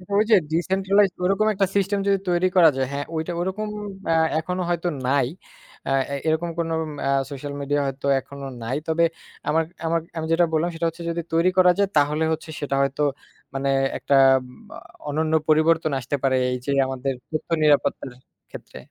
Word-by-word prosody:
ওই 210 Hz, -, +5 dB
যে -, -, +9 dB, 0.2 s
ডিসেন্ট্রালাইজড 190 Hz, +3 st, +2 dB
ওরকম 195 Hz, +3 st, +2 dB
একটা 195 Hz, 0 st, +2 dB
সিস্টেম 200 Hz, 0 st, +1 dB
যদি 200 Hz, 0 st, +4 dB
তৈরি 175 Hz, +1 st, +2 dB
করা 170 Hz, -3 st, +7 dB
যায়, 130 Hz, -1 st, 0 dB
হ্যাঁ, 145 Hz, 0 st, -3 dB
ঐটা 160 Hz, +2 st, -2 dB
ওরকম 190 Hz, +4 st, -3 dB, 0.4 s
অ্যা 165 Hz, -, +2 dB, 0.2 s
এখনো 180 Hz, +3 st, -3 dB
হয়তো 175 Hz, 0 st, -1 dB, 0.2 s
নাই। 135 Hz, -2 st, +2 dB, 0.6 s
আ -, -, 0 dB, 0.2 s
এ -, -, 0 dB
এরকম 160 Hz, +2 st, +1 dB, 0.5 s
ম্যা 135 Hz, -, 0 dB, 0.2 s
সোশ্যাল 140 Hz, +1 st, -6 dB
মিডিয়া 145 Hz, +1 st, 0 dB
হয়তো 135 Hz, +1 st, -5 dB
এখনো 140 Hz, +1 st, -10 dB, 0.2 s
নাই। 130 Hz, +5 st, -2 dB
তবে 165 Hz, +1 st, +2 dB, 0.5 s
আমার 160 Hz, +2 st, +2 dB, 0.2 s
আমার 165 Hz, +1 st, +1 dB, 0.2 s
আমি 160 Hz, -, -2 dB
যেটা 170 Hz, +1 st, +4 dB
বললাম 160 Hz, +2 st, +1 dB
সেটা 165 Hz, +1 st, -2 dB
হচ্ছে 165 Hz, +1 st, -10 dB
যদি 170 Hz, 0 st, -2 dB
তৈরি 165 Hz, +3 st, +4 dB
করা 180 Hz, -1 st, +7 dB
যায় 200 Hz, -, +3 dB
তাহলে 150 Hz, +2 st, +2 dB
হচ্ছে 160 Hz, 0 st, -6 dB
সেটা 140 Hz, -1 st, -1 dB
হয়তো 140 Hz, +2 st, -1 dB, 0.5 s
মানে 135 Hz, 0 st, -1 dB, 0.3 s
একটা 140 Hz, -, +1 dB, 0.2 s
এমা 125 Hz, -1 st, -14 dB, 0.3 s
অনন্য 155 Hz, +2 st, -1 dB
পরিবর্তন 160 Hz, 0 st, +3 dB
আসতে 135 Hz, +3 st, -3 dB
পারে 130 Hz, -1 st, +3 dB, 0.2 s
এই 125 Hz, -, -1 dB
যে 140 Hz, -, -1 dB, 0.2 s
আমাদের 135 Hz, +1 st, -2 dB, 0.2 s
তথ্য 155 Hz, +2 st, -4 dB
নিরাপত্তার 145 Hz, -2 st, +2 dB, 0.4 s
ক্ষেত্রে। -, -, -11 dB
160 Hz, 175 wpm, -23 LUFS, 140-175 Hz, 0.6 s, যে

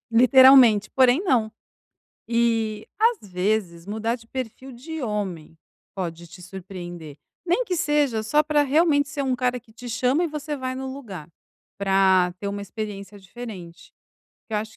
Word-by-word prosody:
Literalmente, 250 Hz, -3 st, +6 dB
porém, 260 Hz, +4 st, +4 dB
não. 235 Hz, -, +2 dB, 0.8 s
E, 225 Hz, -2 st, 0 dB
às 450 Hz, -, +1 dB
vezes, 180 Hz, -2 st, -1 dB
mudar 220 Hz, +3 st, -2 dB
de 230 Hz, -2 st, -19 dB
perfil 260 Hz, +2 st, -7 dB
de 305 Hz, +6 st, -7 dB
homem 190 Hz, -8 st, -4 dB, 0.4 s
pode 170 Hz, -2 st, -5 dB
te 180 Hz, +2 st, -14 dB
surpreender, 175 Hz, -4 st, -9 dB, 0.3 s
nem 360 Hz, +9 st, +1 dB
que 370 Hz, -5 st, -2 dB
seja 295 Hz, -8 st, +1 dB
só 295 Hz, +8 st, +2 dB
pra 300 Hz, -1 st, +2 dB
realmente 290 Hz, 0 st, +2 dB
ser 290 Hz, -1 st, -4 dB
um 265 Hz, -2 st, 0 dB
cara 250 Hz, 0 st, 0 dB
que 225 Hz, -1 st, -23 dB
te 245 Hz, +2 st, -10 dB
chama 255 Hz, +8 st, +1 dB
e -, -, +1 dB
você 300 Hz, -1 st, -5 dB
vai 255 Hz, -1 st, -4 dB
no 265 Hz, 0 st, -5 dB
lugar, 200 Hz, -, -9 dB, 0.5 s
pra 190 Hz, -2 st, +3 dB
ter 200 Hz, -, -3 dB
uma 200 Hz, 0 st, -4 dB
experiência 200 Hz, 0 st, -7 dB
diferente. 185 Hz, -4 st, -10 dB, 0.6 s
Que 220 Hz, -, -5 dB
eu -, -, +2 dB
acho 215 Hz, +1 st, -7 dB
225 Hz, 160 wpm, -24 LUFS, 195-265 Hz, 0.8 s, Literalmente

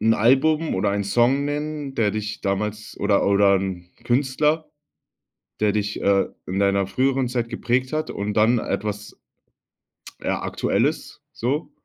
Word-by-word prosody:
'n 110 Hz, +1 st, +4 dB
Album 150 Hz, +8 st, +3 dB
oder 100 Hz, +2 st, +1 dB
einen 100 Hz, 0 st, -1 dB
Song 120 Hz, +7 st, +2 dB
nennen, 145 Hz, -1 st, -3 dB
der 105 Hz, -4 st, +2 dB
dich 105 Hz, +1 st, -4 dB
damals 105 Hz, +2 st, -3 dB
oder 100 Hz, -1 st, +2 dB
oder 100 Hz, 0 st, +4 dB
'n 95 Hz, -2 st, -4 dB
Künstler, 145 Hz, +5 st, +1 dB, 0.9 s
der 105 Hz, -1 st, +3 dB
dich, 105 Hz, -1 st, -2 dB
äh, 100 Hz, -1 st, +3 dB, 0.2 s
in 95 Hz, +1 st, -3 dB
deiner 100 Hz, -1 st, +2 dB
früheren 130 Hz, +5 st, +1 dB
Zeit 120 Hz, -2 st, -2 dB
geprägt 125 Hz, +2 st, -1 dB
hat 155 Hz, 0 st, -2 dB
und 100 Hz, 0 st, -3 dB
dann 110 Hz, +3 st, +4 dB
etwas 105 Hz, 0 st, -4 dB, 1.0 s
ja, -, -, -1 dB
aktuelles -, -, -1 dB
so? 135 Hz, +7 st, -2 dB
110 Hz, 140 wpm, -23 LUFS, 100-130 Hz, 1.0 s, n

